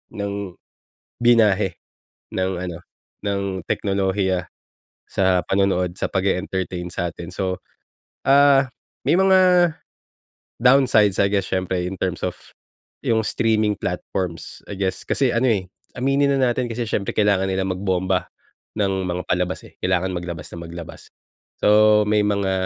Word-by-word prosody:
Ng 100 Hz, -1 st, -3 dB, 0.9 s
binyahe, 105 Hz, -6 st, +4 dB, 0.5 s
ng 95 Hz, 0 st, -1 dB
ano, 90 Hz, -1 st, -5 dB, 0.5 s
ng 100 Hz, -2 st, -2 dB
teknolohiya 95 Hz, -2 st, 0 dB, 0.6 s
sa 95 Hz, -2 st, +2 dB
panonood, 95 Hz, -2 st, 0 dB
sa -, -, 0 dB
pag-e-entertain 95 Hz, -2 st, -2 dB
sa 85 Hz, -1 st, -1 dB
atin, 85 Hz, +2 st, -9 dB
so, 95 Hz, -1 st, -2 dB, 0.7 s
ah, 140 Hz, 0 st, +6 dB, 0.4 s
may -, -, +4 dB
mga 185 Hz, -2 st, +5 dB, 0.9 s
downsides, 125 Hz, -6 st, +4 dB
I 100 Hz, +1 st, +2 dB
guess 100 Hz, -1 st, 0 dB
siyempre 90 Hz, -1 st, -1 dB
in 95 Hz, -, -6 dB
terms 90 Hz, -2 st, -2 dB
of, 90 Hz, -, -3 dB, 0.6 s
yung 110 Hz, -1 st, +1 dB
streaming 110 Hz, -2 st, +1 dB
platforms, 90 Hz, -4 st, -4 dB
I 100 Hz, -, -5 dB
guess. 95 Hz, -1 st, -2 dB
Kasi 135 Hz, -3 st, +2 dB
ano, 125 Hz, +2 st, +2 dB
eh, 100 Hz, -5 st, +1 dB, 0.3 s
aminin 140 Hz, +2 st, +2 dB
na 130 Hz, -2 st, +3 dB
natin 125 Hz, +1 st, -2 dB
kasi 115 Hz, +1 st, -3 dB
siyempre 105 Hz, -2 st, -2 dB
kailangan 100 Hz, -2 st, +2 dB
nilang 95 Hz, 0 st, -1 dB
magbomba, 95 Hz, -1 st, -1 dB, 0.5 s
ng 95 Hz, -2 st, 0 dB
mga 90 Hz, +1 st, -2 dB
palabas, 90 Hz, 0 st, -1 dB
eh, -, -, -18 dB
kailangan 95 Hz, 0 st, +1 dB
maglabas 85 Hz, -3 st, -5 dB
ng 85 Hz, -, -7 dB
maglabas. 85 Hz, -1 st, -9 dB, 0.5 s
So, 105 Hz, 0 st, +6 dB
may 105 Hz, 0 st, +3 dB
mga, 100 Hz, -2 st, 0 dB
95 Hz, 130 wpm, -22 LUFS, 90-110 Hz, 0.9 s, ah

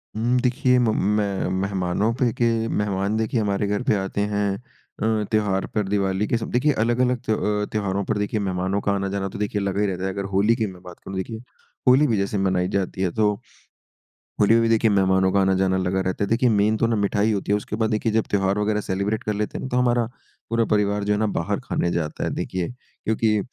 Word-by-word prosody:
हुँ, 120 Hz, +3 st, +1 dB
देखिए 125 Hz, 0 st, +2 dB
म 120 Hz, -2 st, +2 dB, 0.3 s
मैं 100 Hz, -2 st, -1 dB
मेहमानों 100 Hz, +2 st, 0 dB
पे 125 Hz, -3 st, +2 dB
के 120 Hz, -, 0 dB, 0.2 s
मेहमान 105 Hz, 0 st, -1 dB
देखिए 110 Hz, +1 st, 0 dB
हमारे 100 Hz, -1 st, 0 dB
घर 105 Hz, 0 st, -1 dB
पे -, -, +4 dB
आते 95 Hz, +1 st, -2 dB
हैं। 100 Hz, -1 st, 0 dB, 0.5 s
अ, 110 Hz, 0 st, +1 dB
त्योहार 105 Hz, -3 st, +1 dB
पर 105 Hz, -, +2 dB
दिवाली 100 Hz, 0 st, 0 dB
के 120 Hz, -, +1 dB
सब 115 Hz, -, -5 dB
देखिए 130 Hz, +5 st, +3 dB
अलग, 120 Hz, +1 st, 0 dB
अलग 125 Hz, 0 st, +2 dB
त्य 110 Hz, -, +1 dB
अ, 105 Hz, -1 st, 0 dB
त्योहारों 100 Hz, -2 st, -1 dB
पर 110 Hz, -, -1 dB
देखिए 105 Hz, +1 st, -1 dB
मेहमानों 95 Hz, 0 st, -1 dB
का 100 Hz, -, 0 dB
आना-जाना 100 Hz, 0 st, -1 dB
तो 105 Hz, -, -8 dB
देखिए 105 Hz, 0 st, -1 dB
लगा 100 Hz, 0 st, -1 dB
ही -, -, +3 dB
रहता 95 Hz, -1 st, -3 dB
है। 95 Hz, -, 0 dB
अगर 100 Hz, -, -3 dB
होली 105 Hz, +4 st, +3 dB
की 110 Hz, -2 st, -1 dB
मैं 90 Hz, -2 st, -11 dB
बात 90 Hz, -1 st, -11 dB
करूँ 95 Hz, -, -9 dB
तो -, -, -3 dB
देखिए 110 Hz, +4 st, -4 dB, 0.5 s
होली 135 Hz, +4 st, +6 dB
भी 115 Hz, -, +1 dB
जैसे 100 Hz, +1 st, -1 dB
मनाई 95 Hz, -2 st, +1 dB
जाती 95 Hz, -1 st, -2 dB
है 90 Hz, -, +1 dB
तो 105 Hz, +2 st, +2 dB, 1.1 s
होली 105 Hz, +2 st, +5 dB
में 115 Hz, -, +5 dB
भी 115 Hz, -, +2 dB
देखिए 115 Hz, 0 st, +3 dB
मेहमानों 95 Hz, -1 st, +3 dB
का 100 Hz, -, +4 dB
आना-जाना 95 Hz, 0 st, +2 dB
लगा 95 Hz, +1 st, 0 dB
रहता 95 Hz, +2 st, -1 dB
है। -, -, 0 dB
देखिए 120 Hz, +2 st, +3 dB
मेन 105 Hz, 0 st, +2 dB
तो 115 Hz, -, +2 dB
ना 115 Hz, -, +1 dB
मिठाई 105 Hz, +1 st, +1 dB
होती 100 Hz, -1 st, -2 dB
है। -, -, +4 dB
उसके 105 Hz, -, -5 dB
बाद 110 Hz, 0 st, 0 dB
देखिए 110 Hz, +1 st, 0 dB
जब 110 Hz, 0 st, +2 dB
त्योहार 100 Hz, 0 st, +1 dB
वग़ैरह 105 Hz, 0 st, 0 dB
सेलिब्रेट 100 Hz, +4 st, -2 dB
कर 105 Hz, -, -1 dB
लेते 105 Hz, +1 st, -3 dB
हैं -, -, -6 dB
ना 130 Hz, -, -4 dB
तो 125 Hz, -, 0 dB
हमारा 120 Hz, -1 st, +2 dB, 0.4 s
पूरा 115 Hz, 0 st, +2 dB
परिवार 105 Hz, -1 st, +1 dB
जो 105 Hz, +1 st, +1 dB
है 105 Hz, -, 0 dB
ना 110 Hz, -, +2 dB
बाहर 85 Hz, -, -1 dB
खाने 85 Hz, -, -1 dB
जाता 80 Hz, -3 st, -2 dB
है -, -, 0 dB
देखिए 90 Hz, -2 st, -3 dB
क्योंकि 110 Hz, -3 st, -1 dB
105 Hz, 235 wpm, -23 LUFS, 95-110 Hz, 1.1 s, होली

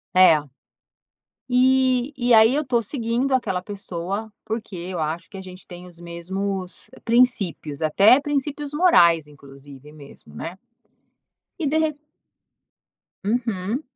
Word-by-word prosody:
É. 155 Hz, -5 st, +5 dB, 1.0 s
E 260 Hz, +1 st, +2 dB
e 245 Hz, -1 st, +2 dB
aí 220 Hz, +3 st, +6 dB
eu 300 Hz, -1 st, -1 dB
tô 240 Hz, -2 st, +1 dB
seguindo 240 Hz, +3 st, -2 dB
aquela 190 Hz, -8 st, 0 dB
pessoa, 200 Hz, +2 st, -5 dB
porque 220 Hz, -3 st, -5 dB
eu 175 Hz, 0 st, -5 dB
acho 160 Hz, +2 st, -3 dB
que 195 Hz, -, -10 dB
a -, -, -7 dB
gente 185 Hz, 0 st, -12 dB
tem 180 Hz, 0 st, -11 dB
os 170 Hz, -1 st, -15 dB
mesmos 185 Hz, +2 st, -5 dB, 0.2 s
princípios, 205 Hz, -, +1 dB
até 200 Hz, -, +5 dB
princípios 290 Hz, 0 st, -3 dB
morais 170 Hz, -, +4 dB
inclusive 140 Hz, 0 st, -15 dB
mesmo, 140 Hz, -, -15 dB
né? 170 Hz, -, -7 dB, 1.0 s
E 315 Hz, -, -2 dB
derre 310 Hz, 0 st, 0 dB, 1.3 s
Uhum. 225 Hz, +1 st, -2 dB
200 Hz, 120 wpm, -22 LUFS, 170-250 Hz, 1.3 s, aí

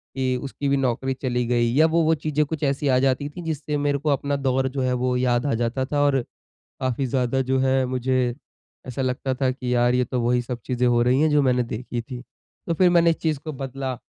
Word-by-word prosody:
कि 130 Hz, -1 st, 0 dB
उसकी 140 Hz, +1 st, -4 dB
भी 140 Hz, -, +2 dB
नौकरी 130 Hz, 0 st, 0 dB
चली 125 Hz, -2 st, -2 dB
गई, 120 Hz, -1 st, +2 dB
या 155 Hz, +3 st, +6 dB
वो-वो 160 Hz, 0 st, +2 dB
चीज़ें 150 Hz, 0 st, 0 dB
कुछ 160 Hz, +1 st, -5 dB
ऐसी 140 Hz, +1 st, 0 dB
आ 130 Hz, -2 st, +4 dB
जाती 135 Hz, +2 st, +1 dB
थीं 175 Hz, +4 st, -9 dB
जिससे 150 Hz, -2 st, -3 dB
मेरे 145 Hz, 0 st, +1 dB
को 150 Hz, +2 st, -2 dB
अपना 140 Hz, 0 st, 0 dB
दौर 135 Hz, -1 st, 0 dB
जो 135 Hz, +1 st, -3 dB
है 130 Hz, 0 st, +1 dB
वो 125 Hz, 0 st, 0 dB
याद 125 Hz, 0 st, +1 dB
आ 140 Hz, -, +1 dB
जाता 120 Hz, +3 st, -1 dB
था, 145 Hz, +2 st, -1 dB
और 140 Hz, -2 st, +3 dB, 0.6 s
काफ़ी 130 Hz, 0 st, -1 dB
ज़्यादा 130 Hz, +1 st, 0 dB
जो 130 Hz, 0 st, 0 dB
है 130 Hz, 0 st, +2 dB
मुझे 125 Hz, -1 st, 0 dB, 0.5 s
ऐसा 130 Hz, +1 st, -4 dB
लगता 130 Hz, +1 st, -1 dB
था 130 Hz, 0 st, +1 dB
कि 125 Hz, -1 st, -3 dB
यार, 120 Hz, 0 st, +3 dB
ये 125 Hz, 0 st, +2 dB
तो 125 Hz, +1 st, -2 dB
वही 120 Hz, +1 st, +2 dB
सब 120 Hz, -1 st, -6 dB
चीज़ें 125 Hz, 0 st, 0 dB
हो 120 Hz, -1 st, +3 dB
रही 125 Hz, +3 st, +3 dB
हैं 155 Hz, -, +4 dB
जो 150 Hz, -1 st, +3 dB
मैंने 125 Hz, -2 st, +2 dB
देखी 120 Hz, +1 st, -5 dB
थी। 125 Hz, +1 st, -8 dB, 0.5 s
तो 170 Hz, -, +1 dB
फिर 180 Hz, +2 st, +4 dB
मैंने 170 Hz, -1 st, +4 dB
इस 165 Hz, -, +2 dB
चीज़ 155 Hz, -3 st, -1 dB
को 155 Hz, -, -4 dB
बदला। 135 Hz, -1 st, -5 dB
130 Hz, 240 wpm, -23 LUFS, 125-145 Hz, 0.6 s, या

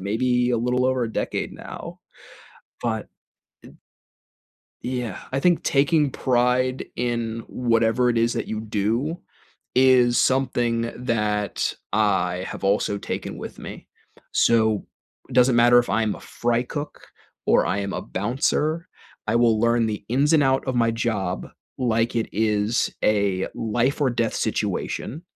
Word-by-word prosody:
maybe 125 Hz, +5 st, +1 dB
a 120 Hz, -, +1 dB
little 125 Hz, +2 st, +1 dB
over 130 Hz, -1 st, +1 dB
a 115 Hz, -, -5 dB
decade -, -, -2 dB
now, -, -, -9 dB, 0.8 s
but, 110 Hz, -3 st, -2 dB, 0.6 s
eh -, -, -12 dB, 1.1 s
Yeah, 125 Hz, -5 st, -3 dB
I 135 Hz, -, 0 dB
think 175 Hz, +2 st, +3 dB
taking 145 Hz, 0 st, +3 dB
pride 125 Hz, +1 st, +1 dB
in 115 Hz, -2 st, -2 dB
whatever 115 Hz, 0 st, +2 dB
it 115 Hz, -, +1 dB
is 115 Hz, +1 st, +2 dB
that -, -, -2 dB
you 110 Hz, 0 st, -3 dB
do, 110 Hz, -, -1 dB, 0.6 s
is 125 Hz, -2 st, +5 dB
something 120 Hz, -3 st, +1 dB
that 105 Hz, -4 st, -1 dB, 0.2 s
I 95 Hz, -4 st, +1 dB
have -, -, -7 dB
also 100 Hz, +1 st, +1 dB
taken -, -, -5 dB
with -, -, -8 dB
me, -, -, -9 dB, 0.5 s
so 110 Hz, -2 st, +3 dB, 0.4 s
it 130 Hz, -, -9 dB
doesn't 125 Hz, -1 st, +5 dB
matter 120 Hz, +1 st, +6 dB
if 120 Hz, -, +1 dB
I'm 110 Hz, 0 st, +1 dB
a -, -, -11 dB
fry 120 Hz, 0 st, -1 dB
cook 145 Hz, +3 st, -6 dB, 0.4 s
or -, -, +4 dB
I 100 Hz, -, 0 dB
am 100 Hz, -1 st, -3 dB
a -, -, -4 dB
bouncer, 150 Hz, -, -1 dB, 0.4 s
I 115 Hz, -, +2 dB
will 115 Hz, -2 st, +3 dB
learn 115 Hz, -1 st, +3 dB
the 105 Hz, -1 st, -4 dB
ins 140 Hz, +6 st, +2 dB
and 155 Hz, -, +5 dB
out 135 Hz, 0 st, +1 dB
of 130 Hz, -, -1 dB
my 115 Hz, -1 st, +3 dB
job, 110 Hz, -5 st, -2 dB, 0.3 s
like 115 Hz, -2 st, +1 dB
it 115 Hz, -, 0 dB
is 105 Hz, +1 st, +1 dB
a 100 Hz, -3 st, +1 dB
life-or-death 120 Hz, +1 st, 0 dB
situation, 155 Hz, +8 st, -2 dB
120 Hz, 140 wpm, -23 LUFS, 110-125 Hz, 1.1 s, matter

